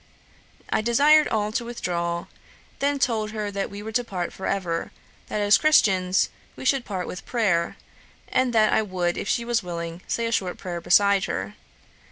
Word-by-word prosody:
'I - - +2
desired 290 +7 +5
all 210 -1 -1
to 235 - -1
withdraw, 170 -7 -3 0.5
then 285 0 +1
told 225 -5 0
her 210 -2 -3
that 200 -1 -3
we 205 +1 -8
were 220 - -6
to 245 +2 +1
part 180 -6 -4
for 190 - -5
ever; 175 -4 -2 0.4
that 210 - -2
as 205 +1 +5
Christians, 190 -12 +3 0.2
we - - -9
should 265 -1 +2
part 185 -3 -3
with 180 - -7
prayer; 195 -9 0 0.5
and 255 -1 +1
that 215 -2 +4
I - - +4
would, 180 -4 -1
if - - -4
she 235 - 0
was 235 -1 +1
willing, 170 -1 -6
say 230 - -1
a 230 - -1
short 185 -5 -1
prayer 175 -2 -5
beside 195 +3 +4
her. 100 +2 -4
205 Hz, 185 wpm, -24 LUFS, 180-235 Hz, 0.5 s, desired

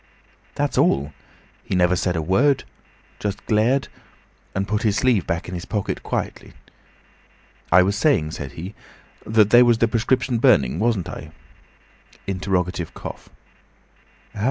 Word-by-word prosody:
"That's - - 0
all. 70 +2 +2 0.5
He - - -3
never 90 0 +3
said 90 0 -1
a 80 - -1
word; 125 - +2 0.6
just 105 -1 -4
glared, 115 +6 +2 0.7
and 95 +1 -1
put 105 0 -1
his 105 -3 +1
sleeve 115 -8 +2
back 85 +1 -2
in 90 - -7
his 90 0 -5
pocket 105 -3 -3
quickly. - - -4 1.2
'I 90 - +7
was 100 +2 0
saying,' 105 - +2
said 70 -4 -7
he, 90 +5 -7 0.5
'that 110 -1 +3
there 120 +1 +8
was 120 -2 +4
the 115 - +2
prescription 120 +2 0
burning, 95 - +3
wasn't 110 -5 0
I?' - - -8 1.0
Interrogative 90 -3 -2
cough. - - -8
100 Hz, 135 wpm, -22 LUFS, 90-115 Hz, 1.2 s, there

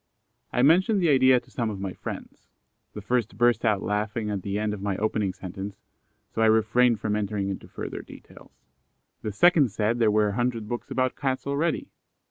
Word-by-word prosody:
I 125 - +1
mentioned 185 +8 +4
the 175 -3 +2
idea 130 -2 +5
to - - -23
some 115 -3 -2
of 100 -3 -5
my 95 -1 -4
friends: - - -8 0.5
the 105 - -7
first 115 -3 -1
burst 120 -1 +3
out 105 -4 +1
laughing 105 +1 -2
at 100 -2 -2
the 100 +2 -3
end 105 0 -1
of 105 - -6
my 100 -1 -2
opening 105 -2 0
sentence, 95 +3 -8 0.5
so 115 - -1
I 110 - +5
refrained 110 +1 +3
from 105 0 -1
entering 100 -1 -2
into 95 - -6
further - - -6
details. - - -16 0.6
The 105 - -3
second 150 - +4
said 110 +3 -1
there 115 -2 +4
were 105 0 +3
a - - -3
hundred 120 -1 -1
books 120 +2 -5
about 130 -1 0
Cats 130 -1 -2
already. 145 +3 -1
110 Hz, 195 wpm, -26 LUFS, 105-125 Hz, 0.6 s, idea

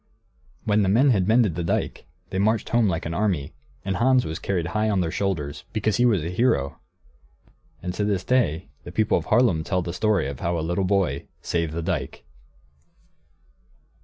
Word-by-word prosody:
When 105 0 +2
the 95 - +2
men 130 +7 +5
had 95 -5 +2
mended 110 -4 +4
the 85 +2 -3
dike, 100 +5 -2 0.2
they 95 - -1
marched 110 +2 +1
home 115 -2 +3
like 90 -1 -1
an 80 - -3
army, 85 -8 -1 0.3
and 95 -1 -1
Hans 130 +1 +3
was 80 0 -4
carried 85 -4 -2
high 110 0 +1
on 100 -3 +1
their 85 -2 -1
shoulders, 75 -8 -2
because 110 -1 0
he 120 - +3
was 100 -9 +2
a 85 - -3
hero. 90 - +1 1.0
And 90 0 -3
to 105 - -2
this 100 -3 0
day 95 -11 +1
the - - -8
people 110 0 +2
of - - -9
Haarlem 110 -11 +3
tell 90 +1 -1
the 85 -1 -4
story 100 -5 +1
of 70 -1 -6
how 85 +3 -1
a 80 - -2
little 90 +3 0
boy 90 -8 0 0.2
saved 85 -2 -1
the 85 0 -3
dike. - - -3
95 Hz, 190 wpm, -24 LUFS, 85-110 Hz, 1.0 s, men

